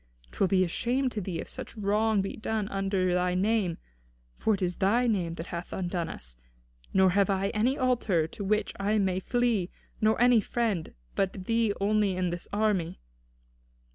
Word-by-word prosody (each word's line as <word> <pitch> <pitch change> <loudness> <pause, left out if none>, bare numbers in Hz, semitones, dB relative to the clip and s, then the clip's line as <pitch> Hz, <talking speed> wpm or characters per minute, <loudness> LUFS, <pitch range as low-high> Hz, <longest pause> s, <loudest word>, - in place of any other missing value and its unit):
'Twill 195 - +1
be 185 0 +3
a - - 0
shame 250 +8 0
to 215 - -3
thee 180 -2 -4
if - - -5
such - - -8
wrong 210 0 +2
be 195 - -4
done 220 -1 -2
under 195 -2 0
thy 180 0 +1
name; 195 -3 +1 0.6
for 220 - +1
it 195 - -9
is 180 -1 -1
thy 225 +6 +3
name 180 -8 0
that 165 - -6
hath 175 -1 -6
undone 175 -3 -2
us. - - -9 0.5
Nor 190 -1 +4
have 200 +1 +3
I 195 0 +1
any 235 +7 +1
altar 230 -10 +1
to 180 +5 -7
which 210 +2 0
I 205 +2 +1
may 190 -2 +1
flee, 230 -4 0 0.3
nor 220 0 +3
any 245 -2 +5
friend 210 - -2 0.2
but 190 -1 -1
thee 230 -1 +2
only 205 -1 +2
in 180 -1 0
this 175 0 -5
army." 205 - 0
195 Hz, 180 wpm, -28 LUFS, 180-220 Hz, 0.6 s, any